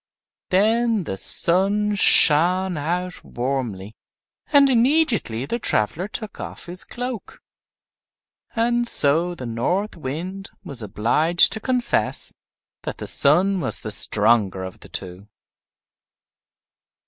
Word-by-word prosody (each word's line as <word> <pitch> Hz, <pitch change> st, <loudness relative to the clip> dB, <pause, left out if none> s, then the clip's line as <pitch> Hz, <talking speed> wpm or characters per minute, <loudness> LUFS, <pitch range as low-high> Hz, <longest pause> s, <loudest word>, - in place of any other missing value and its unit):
Then 220 Hz, +2 st, +1 dB
the 95 Hz, -, -5 dB
Sun 200 Hz, -, +2 dB
shined 180 Hz, 0 st, +5 dB
out 180 Hz, +4 st, -4 dB
warmly, 120 Hz, -6 st, -5 dB, 0.6 s
and 285 Hz, -2 st, +5 dB
immediately 240 Hz, -, +1 dB
the 235 Hz, +12 st, -4 dB
traveler 160 Hz, -, -1 dB
took 215 Hz, 0 st, -8 dB
off -, -, -9 dB
his 180 Hz, +1 st, -6 dB
cloak. 245 Hz, -2 st, -7 dB, 1.2 s
And 240 Hz, +1 st, 0 dB
so 165 Hz, +1 st, +3 dB
the 130 Hz, -, -8 dB
North 175 Hz, -, -3 dB
Wind 175 Hz, +7 st, -7 dB
was 140 Hz, -10 st, -4 dB
obliged 120 Hz, -, +2 dB
to 220 Hz, -, -4 dB
confess 250 Hz, +1 st, 0 dB, 0.5 s
that -, -, -7 dB
the -, -, -8 dB
Sun 185 Hz, +7 st, +2 dB
was -, -, -5 dB
the 110 Hz, -, -6 dB
stronger 105 Hz, -3 st, +1 dB
of 95 Hz, -1 st, -9 dB
the -, -, -15 dB
two. 95 Hz, +2 st, -8 dB
175 Hz, 110 wpm, -21 LUFS, -, 1.2 s, shined